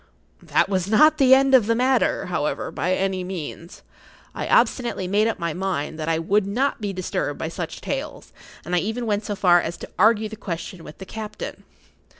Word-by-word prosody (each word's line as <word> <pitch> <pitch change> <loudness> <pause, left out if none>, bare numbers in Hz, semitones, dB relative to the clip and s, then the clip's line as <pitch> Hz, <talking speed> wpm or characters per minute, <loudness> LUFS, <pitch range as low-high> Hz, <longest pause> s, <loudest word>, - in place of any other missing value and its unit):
That - - +1
was 190 -2 -1
not 305 +9 +5
the 265 -1 +7
end 270 0 +3
of 245 -5 +6
the 230 - +2
matter, 255 +1 +1
however, 160 -4 -2
by 180 +2 0
any 190 -1 -1
means. 175 -2 -7 0.5
I - - -4
obstinately 235 -7 +2
made 205 +4 +2
up 225 - -1
my 170 -3 -2
mind 175 -4 -3
that 155 +1 -2
I 165 - +2
would 195 +5 +1
not 250 +5 -1
be 205 -1 -2
disturbed 185 -2 -3
by - - -4
such - - -6
tales, - - -5 0.3
and 175 +2 -1
I - - +3
even 225 +6 -3
went 210 -1 -1
so 205 - -3
far 175 -3 +4
as 170 - -5
to - - -10
argue 220 0 +4
the 220 - -8
question 175 -3 -6
with 150 - -11
the 190 - -9
captain. 215 +1 -7
195 Hz, 200 wpm, -23 LUFS, 180-225 Hz, 0.5 s, the